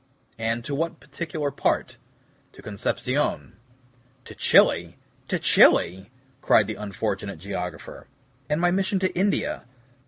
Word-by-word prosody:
"And 115 Hz, +1 st, -2 dB
to 145 Hz, -, -4 dB
what 165 Hz, +3 st, -2 dB
particular 150 Hz, 0 st, -4 dB
part?" -, -, -1 dB, 0.6 s
"To -, -, -15 dB
Concepcion." 125 Hz, +7 st, -2 dB, 0.7 s
"To -, -, -10 dB
Chili! -, -, +3 dB, 0.3 s
to -, -, 0 dB
Chili!" 95 Hz, +4 st, +4 dB, 0.3 s
cried 110 Hz, -, +4 dB
the 110 Hz, -, -4 dB
unfortunate 100 Hz, -2 st, -4 dB
geographer. 90 Hz, 0 st, -7 dB, 0.4 s
"And 150 Hz, +1 st, +1 dB
my 175 Hz, 0 st, +3 dB
mission 195 Hz, +1 st, +1 dB
to 185 Hz, 0 st, -1 dB
India. 195 Hz, +3 st, 0 dB
125 Hz, 120 wpm, -25 LUFS, 100-165 Hz, 0.7 s, Chili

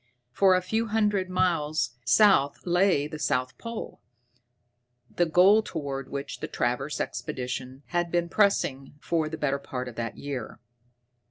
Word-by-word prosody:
For 190 Hz, +6 st, +4 dB
a 185 Hz, -, 0 dB, 0.2 s
hundred 210 Hz, -3 st, +1 dB
miles 155 Hz, -8 st, 0 dB
south 145 Hz, -, +4 dB
lay 175 Hz, -4 st, +3 dB
the 150 Hz, 0 st, -7 dB
south 130 Hz, -3 st, 0 dB
pole, 230 Hz, -1 st, -7 dB, 1.1 s
the 175 Hz, -, +2 dB
goal 190 Hz, +6 st, +6 dB
toward 140 Hz, -8 st, -5 dB
which 140 Hz, 0 st, -5 dB
the -, -, -4 dB
Travers 135 Hz, +5 st, -2 dB
Expeditions 125 Hz, +2 st, -4 dB
had 175 Hz, -1 st, -1 dB
been 175 Hz, -1 st, +1 dB
pressing 145 Hz, -9 st, +1 dB
for 160 Hz, 0 st, -1 dB
the 160 Hz, -, -5 dB
better 140 Hz, -2 st, 0 dB
part 125 Hz, -2 st, -5 dB
of 125 Hz, -, -7 dB
that 115 Hz, -1 st, -4 dB
year. 135 Hz, -5 st, -6 dB
155 Hz, 140 wpm, -27 LUFS, 135-185 Hz, 1.1 s, goal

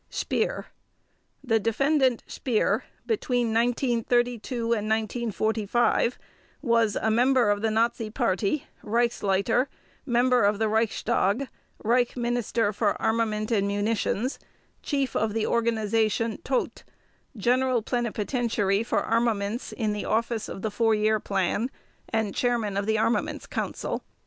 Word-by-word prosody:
SPEER: -, -, -1 dB, 0.8 s
The 225 Hz, -4 st, +2 dB
Defendant 260 Hz, +3 st, +2 dB
SPEER 235 Hz, -5 st, 0 dB, 0.2 s
between 245 Hz, -, 0 dB
1932 240 Hz, 0 st, +1 dB
and 215 Hz, -1 st, -2 dB
1945 220 Hz, +1 st, 0 dB, 0.5 s
was: 230 Hz, -5 st, +2 dB
A 220 Hz, -, +1 dB
member 245 Hz, -1 st, +4 dB
of 205 Hz, 0 st, 0 dB
the 220 Hz, -, +1 dB
Nazi 225 Hz, 0 st, 0 dB
Party, 215 Hz, -, 0 dB, 0.2 s
Reichsleiter, 230 Hz, +1 st, +1 dB, 0.4 s
member 245 Hz, -1 st, +3 dB
of 205 Hz, 0 st, +3 dB
the 220 Hz, +1 st, +1 dB
Reichstag, 220 Hz, +2 st, +1 dB, 0.3 s
Reich 245 Hz, +3 st, +2 dB
Minister 235 Hz, -3 st, 0 dB
for 205 Hz, 0 st, 0 dB
Armament 220 Hz, -1 st, 0 dB
and 200 Hz, -3 st, +2 dB
Munitions, 210 Hz, +4 st, -1 dB, 0.4 s
Chief 275 Hz, -3 st, -1 dB
of 220 Hz, -1 st, 0 dB
the 225 Hz, -, +1 dB
Organization 225 Hz, -1 st, 0 dB
Todt, 260 Hz, -2 st, -1 dB, 0.6 s
General 250 Hz, +2 st, +2 dB
Plenipotentiary 225 Hz, -3 st, 0 dB
for 230 Hz, -, 0 dB
Armaments 230 Hz, -1 st, 0 dB
in 215 Hz, -3 st, -1 dB
the 210 Hz, -, -4 dB
Office 230 Hz, 0 st, -1 dB
of 195 Hz, -, -7 dB
the 220 Hz, -, -1 dB
Four 225 Hz, +1 st, +2 dB
Year 215 Hz, +1 st, +2 dB
Plan, 200 Hz, +5 st, -1 dB, 0.4 s
and 220 Hz, -3 st, -1 dB
Chairman 235 Hz, -5 st, 0 dB
of 200 Hz, +1 st, -1 dB
the 220 Hz, 0 st, +2 dB
Armaments 230 Hz, +2 st, 0 dB
Council. -, -, -3 dB
225 Hz, 120 wpm, -26 LUFS, 215-240 Hz, 0.8 s, member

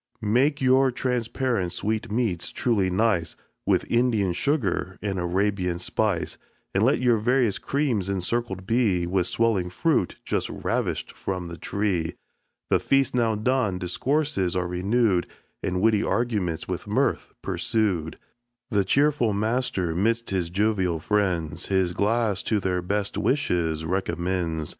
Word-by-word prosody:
Make 135 Hz, +8 st, +2 dB
your 130 Hz, +1 st, +4 dB
transparent 120 Hz, -5 st, -1 dB
sweetmeats 110 Hz, -3 st, -1 dB
truly 105 Hz, -6 st, +1 dB
nice 90 Hz, -4 st, +1 dB, 0.3 s
With -, -, +2 dB
Indian 115 Hz, -6 st, +2 dB
sugar 100 Hz, -, -1 dB
and 100 Hz, -2 st, -2 dB
Arabian 90 Hz, 0 st, 0 dB
spice. 95 Hz, 0 st, -1 dB, 0.3 s
And -, -, +2 dB
let -, -, +3 dB
your 120 Hz, -3 st, +3 dB
various 120 Hz, -1 st, +2 dB
creams 125 Hz, -10 st, 0 dB
encircled 95 Hz, +1 st, -2 dB
be 105 Hz, -6 st, +2 dB
With 90 Hz, 0 st, 0 dB
swelling 105 Hz, -6 st, +1 dB
fruit 95 Hz, -, +1 dB
just -, -, -1 dB
ravish'd -, -, -2 dB
from 90 Hz, -3 st, -4 dB
the 85 Hz, -, -7 dB
tree. 95 Hz, -6 st, -1 dB, 0.6 s
The -, -, +5 dB
feast 135 Hz, -1 st, +2 dB
now 115 Hz, -3 st, +2 dB
done, 110 Hz, -3 st, +1 dB
discourses 100 Hz, -, 0 dB
are 90 Hz, -1 st, 0 dB
renewed, 95 Hz, +1 st, +1 dB, 0.3 s
And 90 Hz, 0 st, -1 dB
witty 110 Hz, -1 st, +4 dB
arguments 105 Hz, -10 st, -1 dB
with -, -, -4 dB
mirth -, -, 0 dB
pursued; 95 Hz, -8 st, -1 dB, 0.5 s
The 100 Hz, -2 st, +3 dB
cheerful 140 Hz, -2 st, +2 dB
master, 110 Hz, -5 st, 0 dB
'midst 115 Hz, +6 st, 0 dB
his 90 Hz, -3 st, -1 dB
jovial 95 Hz, -2 st, +1 dB
friends, 85 Hz, -4 st, -1 dB
His 95 Hz, -2 st, +1 dB
glass 105 Hz, 0 st, +1 dB
to 110 Hz, -, 0 dB
their 90 Hz, -2 st, -1 dB
best 100 Hz, +3 st, -2 dB
wishes 85 Hz, -, 0 dB
recommends. 85 Hz, -3 st, -1 dB
100 Hz, 130 wpm, -25 LUFS, 90-115 Hz, 0.6 s, The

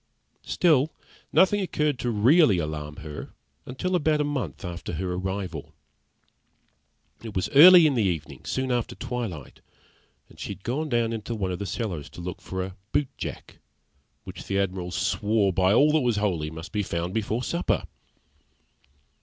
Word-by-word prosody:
Still 155 Hz, -4 st, +3 dB, 0.4 s
nothing 200 Hz, +2 st, +4 dB
occurred 150 Hz, -7 st, -1 dB
to 120 Hz, -, -1 dB
really 120 Hz, -, +5 dB
alarm 75 Hz, -2 st, -4 dB
her 75 Hz, -1 st, -8 dB, 0.4 s
till 185 Hz, +4 st, 0 dB
about 155 Hz, -2 st, +2 dB
a -, -, +2 dB
month 125 Hz, -, -3 dB
after 90 Hz, 0 st, -6 dB
her 90 Hz, +3 st, -2 dB
arrival. 90 Hz, -5 st, -4 dB, 1.5 s
It 110 Hz, -3 st, -8 dB
was 95 Hz, -, -1 dB
early 170 Hz, +4 st, +9 dB
in 150 Hz, -, +3 dB
the 120 Hz, -, +1 dB
evening, 80 Hz, -8 st, -2 dB
soon 130 Hz, -1 st, -1 dB
after 120 Hz, -2 st, -1 dB
twilight, 110 Hz, -, -5 dB, 0.7 s
and -, -, -19 dB
she -, -, -5 dB
had 95 Hz, -, -7 dB
gone 150 Hz, +6 st, -2 dB
down 120 Hz, -2 st, +1 dB
into 115 Hz, +1 st, -4 dB
one 95 Hz, -4 st, -2 dB
of 90 Hz, -, -4 dB
the 100 Hz, -, -4 dB
cellars 90 Hz, -, -4 dB
to -, -, -12 dB
look 90 Hz, +1 st, -6 dB
for 95 Hz, 0 st, -4 dB
a 95 Hz, -1 st, -9 dB, 0.2 s
boot 145 Hz, -2 st, +1 dB
jack, -, -, -7 dB, 0.6 s
which -, -, -9 dB
the 100 Hz, -, -1 dB
Admiral 95 Hz, -2 st, -1 dB
swore 95 Hz, +3 st, +1 dB
by 95 Hz, +1 st, +3 dB
all 145 Hz, +8 st, +5 dB
that 155 Hz, 0 st, +3 dB
was 120 Hz, -3 st, +1 dB
holy 90 Hz, -7 st, -1 dB
must 80 Hz, +3 st, -9 dB
be 105 Hz, -, 0 dB
found 85 Hz, -1 st, -3 dB
before 110 Hz, +2 st, -1 dB
supper. 170 Hz, +5 st, 0 dB
105 Hz, 165 wpm, -26 LUFS, 90-130 Hz, 1.5 s, early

